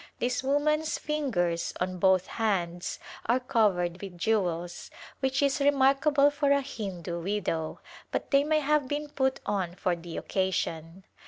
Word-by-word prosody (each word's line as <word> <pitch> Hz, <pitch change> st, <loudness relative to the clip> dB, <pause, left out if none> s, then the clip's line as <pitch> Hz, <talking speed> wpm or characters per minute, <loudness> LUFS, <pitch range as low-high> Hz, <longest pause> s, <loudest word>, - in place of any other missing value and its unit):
This 250 Hz, +1 st, 0 dB
woman's 305 Hz, +3 st, +1 dB
fingers 195 Hz, -, -1 dB
on 185 Hz, 0 st, -2 dB
both 190 Hz, 0 st, +4 dB
hands 180 Hz, -5 st, -1 dB, 0.3 s
are 240 Hz, +3 st, +3 dB
covered 190 Hz, -8 st, +1 dB
with 190 Hz, -3 st, -8 dB
jewels, 175 Hz, -4 st, -1 dB, 0.3 s
which 265 Hz, 0 st, +1 dB
is 280 Hz, 0 st, +2 dB
remarkable 280 Hz, +1 st, +4 dB
for 290 Hz, -1 st, 0 dB
a 280 Hz, 0 st, +4 dB
Hindu 190 Hz, -10 st, -5 dB
widow, 170 Hz, -4 st, -2 dB, 0.3 s
but -, -, -3 dB
they 280 Hz, 0 st, +5 dB
may 310 Hz, +1 st, +2 dB
have 295 Hz, -1 st, +2 dB
been 295 Hz, +2 st, -3 dB
put 265 Hz, -2 st, 0 dB
on 185 Hz, -4 st, -1 dB
for 185 Hz, -2 st, 0 dB
the 170 Hz, 0 st, -8 dB
occasion. 180 Hz, -2 st, -2 dB
215 Hz, 145 wpm, -28 LUFS, 175-280 Hz, 0.3 s, they